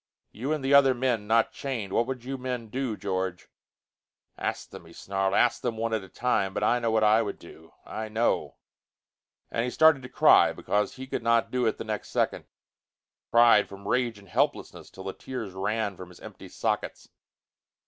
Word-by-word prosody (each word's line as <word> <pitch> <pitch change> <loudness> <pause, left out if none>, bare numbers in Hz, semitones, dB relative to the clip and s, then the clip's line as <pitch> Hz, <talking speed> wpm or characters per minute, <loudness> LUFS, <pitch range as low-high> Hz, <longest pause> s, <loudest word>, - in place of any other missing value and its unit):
You 130 +7 -4
and 150 -3 -2
the 135 - +2
other 135 -2 +6
men 120 -4 -1
not 115 +1 +3
chained? 115 -8 -5
What 120 - +2
would 130 -2 -5
you 135 +1 -3
men 125 -3 -4
do, 125 -2 -3
George?" 95 -2 -3 0.9
"Ask - - -4
them," - - -11
he - - -15
snarled. 95 0 -1
"Ask 120 - +3
them, 115 -2 -2
one 115 0 -2
at 110 - 0
a 95 - -13
time. 100 -5 -1
But 105 - -1
I 120 +3 +3
know 115 -1 0
what 110 -1 +2
I 110 +1 +5
would 105 -3 -4
do. 80 -1 -15
I 110 0 -5
know!" 110 +2 0 1.0
And 115 - -1
he 125 - -1
started 155 +1 +5
to 125 - -9
cry, 130 - +5
because 105 0 -1
he 130 - -7
could 130 - -4
not 115 0 +2
do 125 -2 +1
it 110 - 0
the - - -5
next 110 -2 -5
second; - - -1 0.8
cried 115 -3 +5
from 100 0 -10
rage 120 -2 0
and 100 -1 -16
helplessness - - -1
till 95 - -11
the 95 0 -5
tears 120 -7 -7
ran 105 +1 -2
from 90 0 -10
his 90 - -15
empty - - -11
sockets. - - -3
115 Hz, 200 wpm, -27 LUFS, 100-125 Hz, 1.0 s, other